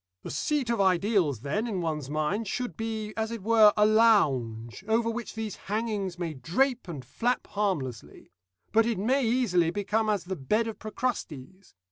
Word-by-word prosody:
"The -, -, -6 dB
seat 260 Hz, -, 0 dB
of 230 Hz, -4 st, +1 dB
ideals, 185 Hz, -, +2 dB
then, 180 Hz, -, -1 dB
in 200 Hz, -5 st, -2 dB
one's 155 Hz, -5 st, -3 dB
mind, 155 Hz, +9 st, -1 dB
should 245 Hz, +5 st, -3 dB
be, 220 Hz, -2 st, -4 dB
as 220 Hz, 0 st, -1 dB
it 230 Hz, -4 st, -6 dB
were, 220 Hz, -1 st, +6 dB
a 210 Hz, -, +5 dB
lounge, 140 Hz, -, +2 dB
over 230 Hz, +1 st, +2 dB
which 235 Hz, 0 st, -6 dB
these 220 Hz, -2 st, -4 dB
hangings 205 Hz, -4 st, -2 dB
may 170 Hz, -3 st, -3 dB
drape 230 Hz, -, 0 dB
and 145 Hz, -7 st, -7 dB
flap 235 Hz, -, -1 dB
harmlessly; 160 Hz, -, -3 dB, 0.4 s
but 225 Hz, +1 st, +4 dB
it 235 Hz, -, 0 dB
may 255 Hz, +8 st, +1 dB
easily 225 Hz, -8 st, +2 dB
become 205 Hz, +4 st, 0 dB
as 205 Hz, -4 st, 0 dB
the 190 Hz, +1 st, -4 dB
bed 210 Hz, -, 0 dB
of 225 Hz, -, -6 dB
Procrustes. 195 Hz, -, -5 dB
210 Hz, 170 wpm, -28 LUFS, 165-225 Hz, 0.4 s, were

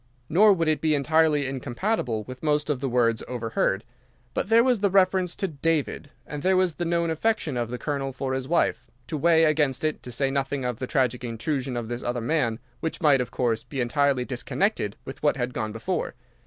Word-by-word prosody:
Nor 205 Hz, +5 st, +6 dB
would 165 Hz, -3 st, 0 dB
it 155 Hz, -1 st, +1 dB
be 155 Hz, -1 st, +2 dB
entirely 150 Hz, 0 st, +3 dB
incompatible 130 Hz, -, -2 dB
with 130 Hz, +3 st, -10 dB
most 150 Hz, -1 st, +1 dB
of 140 Hz, -, -1 dB
the 135 Hz, 0 st, -2 dB
words 115 Hz, -2 st, +2 dB
overheard. 115 Hz, -4 st, -1 dB, 0.5 s
But -, -, -1 dB
there 230 Hz, +1 st, +6 dB
was 250 Hz, -3 st, +2 dB
the 200 Hz, 0 st, +2 dB
reference 185 Hz, -2 st, +3 dB
to 195 Hz, -, -1 dB
David, 155 Hz, -2 st, -1 dB, 0.2 s
and 150 Hz, -1 st, -6 dB
there 185 Hz, +2 st, +3 dB
was 185 Hz, -3 st, +2 dB
the 175 Hz, -, -3 dB
known 170 Hz, 0 st, +1 dB
affection 160 Hz, -, 0 dB
of 120 Hz, -2 st, -2 dB
the 125 Hz, -, -4 dB
Colonel 140 Hz, 0 st, -2 dB
for 130 Hz, 0 st, -3 dB
his 130 Hz, -1 st, -3 dB
wife, 170 Hz, +3 st, +1 dB, 0.2 s
to -, -, -4 dB
weigh 165 Hz, +2 st, +4 dB
against 150 Hz, -4 st, +2 dB
it, 155 Hz, -1 st, -1 dB
to 125 Hz, -, -8 dB
say 135 Hz, +3 st, 0 dB
nothing 135 Hz, -1 st, -1 dB
of 125 Hz, -2 st, -2 dB
the 130 Hz, -, -3 dB
tragic 125 Hz, -2 st, 0 dB
intrusion 125 Hz, +2 st, -2 dB
of 120 Hz, -2 st, -3 dB
this 120 Hz, +1 st, -4 dB
other 120 Hz, 0 st, -2 dB
man, 120 Hz, -2 st, 0 dB, 0.2 s
which 160 Hz, -, -3 dB
might, 145 Hz, -6 st, +4 dB
of 125 Hz, -, -3 dB
course, 115 Hz, -3 st, 0 dB
be 140 Hz, -, -6 dB
entirely 130 Hz, +1 st, +1 dB
disconnected 125 Hz, -, -1 dB
with 135 Hz, -, -8 dB
what 145 Hz, -1 st, +2 dB
had 125 Hz, 0 st, -2 dB
gone 110 Hz, -2 st, -3 dB
before. 140 Hz, -, -3 dB
140 Hz, 210 wpm, -25 LUFS, 125-160 Hz, 0.5 s, Nor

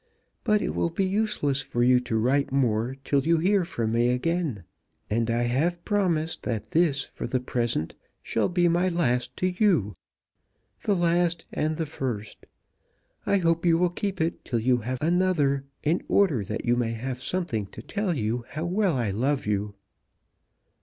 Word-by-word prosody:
But 210 Hz, -2 st, +2 dB
it -, -, -2 dB
will 170 Hz, -, 0 dB
be 190 Hz, +4 st, 0 dB
useless 190 Hz, -9 st, +1 dB
for 120 Hz, -2 st, -1 dB
you 125 Hz, 0 st, +5 dB
to 115 Hz, -2 st, -2 dB
write 130 Hz, +5 st, +1 dB
more 125 Hz, -2 st, +1 dB
till 140 Hz, 0 st, +2 dB
you 165 Hz, +4 st, +2 dB
hear 190 Hz, +4 st, +3 dB
from 115 Hz, -9 st, -2 dB
me 120 Hz, +1 st, +2 dB
again; 135 Hz, -, -1 dB, 0.5 s
and 115 Hz, +2 st, +1 dB
I 120 Hz, +1 st, +1 dB
have 160 Hz, +9 st, 0 dB
promised 170 Hz, -6 st, 0 dB
that 115 Hz, -4 st, -4 dB
this, 155 Hz, -4 st, +2 dB
for -, -, -6 dB
the 130 Hz, -, 0 dB
present, 120 Hz, -9 st, -1 dB, 0.3 s
shall -, -, 0 dB
be 175 Hz, -1 st, +2 dB
my 175 Hz, +2 st, +2 dB
last 125 Hz, -8 st, 0 dB
to 185 Hz, 0 st, +1 dB
you. 135 Hz, -, +2 dB, 0.9 s
The 205 Hz, -, +1 dB
last 175 Hz, -1 st, +1 dB
and 155 Hz, 0 st, -1 dB
the 160 Hz, -, -1 dB
first! 125 Hz, -8 st, -5 dB, 0.8 s
I 200 Hz, -, +4 dB
hope 165 Hz, -2 st, +1 dB
you 170 Hz, -2 st, +4 dB
will 180 Hz, 0 st, +2 dB
keep 195 Hz, +1 st, -3 dB
it 160 Hz, +1 st, -1 dB
till 120 Hz, -, -2 dB
you 125 Hz, +2 st, +2 dB
have 125 Hz, +2 st, -3 dB
another, 160 Hz, -6 st, +2 dB, 0.2 s
in 160 Hz, +4 st, +1 dB
order 160 Hz, -, +3 dB
that 110 Hz, +5 st, -4 dB
you 120 Hz, 0 st, +3 dB
may 120 Hz, -2 st, 0 dB
have 125 Hz, +2 st, -4 dB
something 135 Hz, -, -2 dB
to 110 Hz, -, -11 dB
tell 200 Hz, -, -1 dB
you 115 Hz, -1 st, -1 dB
how 155 Hz, +2 st, -4 dB
well 185 Hz, -3 st, +1 dB
I 115 Hz, -5 st, 0 dB
love 135 Hz, +7 st, 0 dB
you." 105 Hz, 0 st, -1 dB
140 Hz, 175 wpm, -26 LUFS, 120-175 Hz, 0.9 s, you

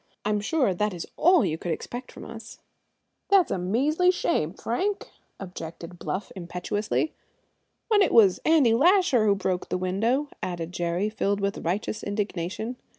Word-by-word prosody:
I'm 210 Hz, 0 st, +1 dB
sure 255 Hz, -, +1 dB
that 210 Hz, +1 st, -1 dB
is 170 Hz, -, -5 dB
all 355 Hz, 0 st, +5 dB
you 160 Hz, +1 st, -2 dB
could 175 Hz, -, -3 dB
expect 245 Hz, +10 st, -5 dB
from -, -, -10 dB
us." 230 Hz, 0 st, -10 dB, 0.7 s
"That's 390 Hz, -3 st, +4 dB
a -, -, 0 dB
measly 280 Hz, -, +2 dB
shame, 335 Hz, -, +1 dB
Frank!" 375 Hz, -, -2 dB, 0.3 s
objected 175 Hz, -2 st, -8 dB
Bluff 190 Hz, +1 st, -4 dB
impetuously. 185 Hz, -, -2 dB, 0.7 s
"When 425 Hz, -2 st, +4 dB
it 390 Hz, -, +3 dB
was 200 Hz, -5 st, +6 dB
Andy 300 Hz, -8 st, +4 dB
Lasher 320 Hz, -, +4 dB
who 200 Hz, -, +4 dB
broke 185 Hz, -2 st, -2 dB
the -, -, 0 dB
window," 225 Hz, +11 st, 0 dB
added 170 Hz, -2 st, -4 dB
Jerry, 175 Hz, +2 st, -1 dB
filled 205 Hz, -2 st, -1 dB
with 200 Hz, 0 st, -1 dB
righteous 195 Hz, +5 st, -2 dB
indignation. 205 Hz, +3 st, -3 dB
210 Hz, 150 wpm, -26 LUFS, 180-265 Hz, 0.7 s, was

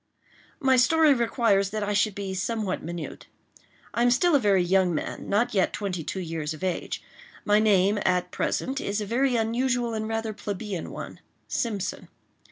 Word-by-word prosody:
My 265 Hz, -2 st, +4 dB
story 310 Hz, +4 st, +5 dB
requires 230 Hz, -5 st, +2 dB
that 215 Hz, +1 st, -3 dB
I 205 Hz, 0 st, -1 dB
should 205 Hz, 0 st, +2 dB
be 200 Hz, -2 st, -4 dB
somewhat 205 Hz, 0 st, -2 dB
minute. 170 Hz, +1 st, -7 dB, 0.7 s
I 235 Hz, -, 0 dB
am 245 Hz, -, +5 dB
still 335 Hz, +8 st, +3 dB
a 285 Hz, -, +6 dB
very 200 Hz, -5 st, +3 dB
young 180 Hz, -1 st, +2 dB
man—not 215 Hz, +9 st, -1 dB
yet 190 Hz, -3 st, +2 dB
twenty 185 Hz, -5 st, -3 dB
two 190 Hz, -, -4 dB
years 160 Hz, -3 st, -3 dB
of 155 Hz, -, -11 dB
age. 185 Hz, -2 st, -2 dB, 0.4 s
My 210 Hz, 0 st, +4 dB
name, 205 Hz, -1 st, +3 dB
at 180 Hz, -1 st, +1 dB
present, 270 Hz, +2 st, -1 dB
is 200 Hz, +1 st, -2 dB
a 210 Hz, -, -3 dB
very 250 Hz, +4 st, +1 dB
usual 240 Hz, +1 st, 0 dB
and 220 Hz, 0 st, -2 dB
rather 225 Hz, 0 st, -2 dB
plebeian 205 Hz, -3 st, -5 dB
one—Simpson. 205 Hz, -5 st, -5 dB
210 Hz, 165 wpm, -26 LUFS, 190-235 Hz, 0.7 s, a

